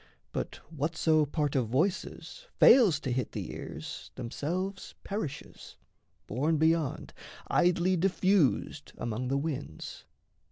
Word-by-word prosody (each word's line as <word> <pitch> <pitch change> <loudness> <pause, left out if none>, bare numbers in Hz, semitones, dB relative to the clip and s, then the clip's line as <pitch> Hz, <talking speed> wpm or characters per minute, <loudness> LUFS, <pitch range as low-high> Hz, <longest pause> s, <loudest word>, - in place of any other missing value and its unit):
But - - -3 0.2
whatso 155 0 +2
part 145 -1 -1
of 125 -4 +2
voices 185 - -2
fails 205 - +7
to 135 - -2
hit 125 -2 -2
The - - -4
ears 75 +2 -7
themselves 185 +11 -4
perishes, 195 -9 -6 0.5
borne 145 +10 0
beyond, 160 -2 +1 0.4
Idly 180 +1 +3
diffused 185 -3 +1
among 120 +2 -3
the 135 +2 +1
winds. 140 - -5
155 Hz, 110 wpm, -30 LUFS, 135-180 Hz, 0.5 s, fails